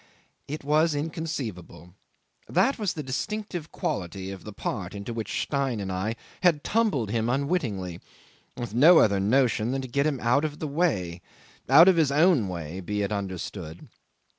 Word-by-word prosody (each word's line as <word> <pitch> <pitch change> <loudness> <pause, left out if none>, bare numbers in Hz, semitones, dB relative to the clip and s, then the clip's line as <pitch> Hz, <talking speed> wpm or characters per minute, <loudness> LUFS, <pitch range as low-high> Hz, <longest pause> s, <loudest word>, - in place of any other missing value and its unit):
'It 150 +1 -5
was 155 +2 +2
inconceivable. 140 - -5 0.6
That 210 - +2
was 205 -5 0
the 150 - -5
distinctive 175 +4 -4
quality 95 +1 -4
of 95 - -9
the 105 - -7
part 100 -1 -4
into 100 +3 -5
which 115 -1 -2
Stein 135 -5 -1
and 95 -1 -4
I 95 +5 -2 0.3
had 165 -5 +3
tumbled 205 - +1
him 115 +1 0
unwittingly, 120 - -1 0.6
with 120 -4 -5
no 155 +9 +7
other 100 -7 +4
notion 115 +1 +2
than 135 0 -1
to - - -5
get 140 +4 +1
him 140 -4 -1
out 120 +5 +2
of 150 -1 -3
the 155 - -4
way; 105 - -1 0.5
out 165 +3 +8
of 185 -3 +5
his 155 -4 +3
own 150 - +4
way, 85 -1 -5
be 105 +2 -2
it 100 - -2
understood. 95 -4 -5
125 Hz, 165 wpm, -26 LUFS, 100-155 Hz, 0.6 s, out